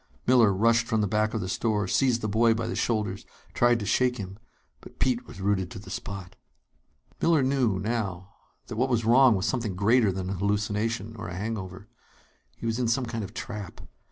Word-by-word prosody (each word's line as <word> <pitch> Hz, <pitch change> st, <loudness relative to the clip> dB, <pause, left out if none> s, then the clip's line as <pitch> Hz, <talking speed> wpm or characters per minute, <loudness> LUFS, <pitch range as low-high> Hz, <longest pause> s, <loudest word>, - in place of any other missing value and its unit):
Miller 120 Hz, -4 st, +5 dB
rushed 115 Hz, +4 st, +3 dB
from 110 Hz, -1 st, +1 dB
the 105 Hz, -, +1 dB
back 110 Hz, +2 st, 0 dB
of 110 Hz, -, -1 dB
the 90 Hz, -, -3 dB
store, 105 Hz, +1 st, 0 dB
seized 125 Hz, +3 st, +2 dB
the 110 Hz, -, -1 dB
boy 115 Hz, +2 st, +3 dB
by 115 Hz, 0 st, -2 dB
the 115 Hz, -, -3 dB
shoulders, 105 Hz, -4 st, -1 dB, 0.3 s
tried 120 Hz, -1 st, +3 dB
to 105 Hz, -, -4 dB
shake 125 Hz, +4 st, +2 dB
him. 95 Hz, -1 st, -7 dB, 0.4 s
But -, -, -15 dB
Pete 125 Hz, -1 st, 0 dB
was -, -, -11 dB
rooted 95 Hz, -2 st, 0 dB
to -, -, -9 dB
the 100 Hz, -, -10 dB
spot. 95 Hz, -2 st, -6 dB, 0.9 s
Miller 165 Hz, -4 st, +4 dB
knew, 130 Hz, -7 st, +1 dB
now, 100 Hz, -3 st, -3 dB, 0.3 s
that 115 Hz, -, -7 dB
what 130 Hz, +3 st, +1 dB
was 115 Hz, -3 st, +1 dB
wrong 125 Hz, 0 st, +6 dB
was 95 Hz, +1 st, -1 dB
something 115 Hz, -6 st, -1 dB
greater 110 Hz, +2 st, +3 dB
than 95 Hz, 0 st, -4 dB
a -, -, -1 dB
hallucination 105 Hz, +2 st, -1 dB
or 85 Hz, -, -6 dB
a 90 Hz, -, -6 dB
hangover. 100 Hz, -1 st, -5 dB, 0.7 s
He -, -, -8 dB
was 115 Hz, +1 st, -1 dB
in 125 Hz, -, +1 dB
some 125 Hz, +3 st, +1 dB
kind 115 Hz, -2 st, -4 dB
of 100 Hz, +3 st, -9 dB
trap. 105 Hz, -6 st, -6 dB
110 Hz, 205 wpm, -27 LUFS, 100-120 Hz, 0.9 s, wrong